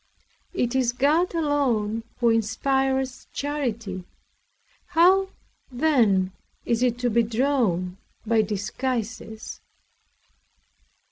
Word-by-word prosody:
It 245 -8 0
is 255 -2 +2
God 305 +8 +2
alone 255 -9 +1 0.2
who 235 -1 +5
inspires 265 +3 0
charity; 230 -10 -3 0.8
how, 375 +4 +4 0.4
then, 235 -9 +3 0.3
is 235 0 0
it 245 -2 +2
to 245 - +2
be 235 +2 +4
drawn 220 -7 0 0.3
by 225 0 +3
disguises? 220 +2 -4
245 Hz, 85 wpm, -25 LUFS, 220-275 Hz, 0.8 s, who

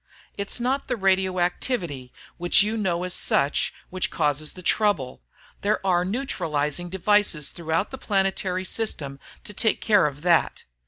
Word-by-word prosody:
It's 200 +3 -2
not 260 +3 -1
the 245 - -1
radioactivity 185 - 0 0.3
which 175 +2 +5
you 215 +2 -1
know 185 -5 -1
as 180 -1 -1
such 140 -4 +2 0.2
which 185 -1 0
causes 150 +1 0
the 180 - -11
trouble 175 - +1 0.4
there 210 +1 +1
are 175 -2 +3
neutralizing 175 - -2
devices 190 -5 +1
throughout 165 +3 -2
the 265 - -7
planetary 190 -2 0
system 145 -11 -3 0.2
to 210 - -9
take 220 +2 +1
care 210 -8 +4
of 145 +1 -7
that. 175 -2 +2
185 Hz, 145 wpm, -24 LUFS, 160-210 Hz, 0.4 s, which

